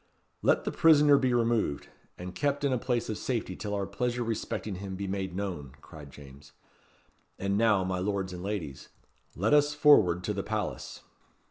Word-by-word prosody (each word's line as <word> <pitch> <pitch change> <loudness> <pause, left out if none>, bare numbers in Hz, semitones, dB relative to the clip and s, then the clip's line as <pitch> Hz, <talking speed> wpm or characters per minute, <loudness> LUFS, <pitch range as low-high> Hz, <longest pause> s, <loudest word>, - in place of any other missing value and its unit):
"Let - - +2
the - - -2
prisoner 150 -3 +5
be 130 -2 +1
removed, 115 -10 0 0.3
and 90 +1 -7
kept 145 0 -1
in 140 -2 +2
a 125 - 0
place 120 -2 -1
of 110 - -4
safety 115 -7 -3
till 105 +1 -4
our 100 -1 -2
pleasure 120 +5 -2
respecting 110 -3 -4
him 95 0 -6
be 100 +1 -4
made 95 -2 -4
known," 85 -9 -5
cried 75 -2 -12
James. 70 +1 -14 0.8
"And 100 +1 -1
now, 105 -3 +3
my 95 0 -2
lords 95 -1 -2
and 90 - -7
ladies, 90 -9 -5 0.5
let 105 - +1
us 145 0 +4
forward 105 - +5
to - - -2
the - - -2
palace." - - -4
100 Hz, 175 wpm, -29 LUFS, 90-120 Hz, 0.8 s, prisoner